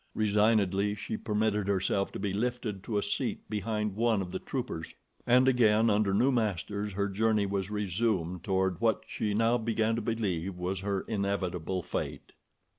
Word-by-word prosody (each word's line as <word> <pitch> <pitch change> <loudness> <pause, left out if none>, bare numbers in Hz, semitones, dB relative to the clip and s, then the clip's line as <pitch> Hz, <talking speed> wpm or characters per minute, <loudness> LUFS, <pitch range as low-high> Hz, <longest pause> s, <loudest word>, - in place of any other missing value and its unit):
Resignedly 105 -2 +2
she 110 - -4
permitted 105 -2 0
herself 100 0 +1
to - - -5
be 100 -1 -2
lifted 115 -2 -2
to 110 - -1
a 100 - +1
seat - - -2
behind 105 -1 -1
one 115 -1 +2
of 90 -2 -4
the - - -3
troopers, 120 -11 -5 0.3
and 125 +2 +5
again, 115 -3 +4
under 105 -1 +2
new 125 +8 +3
masters, 105 -3 -1
her 100 +1 0
journey 105 +1 +1
was 100 -1 -2
resumed 95 -4 -1
toward 95 -1 0
what 115 -2 +2
she 105 -1 -2
now 115 +2 +3
began 110 0 +1
to 115 - -2
believe 100 -5 -2
was 90 +1 -2
her 100 0 -1
inevitable 95 -4 -2
fate. - - -4
105 Hz, 165 wpm, -30 LUFS, 95-110 Hz, 0.3 s, and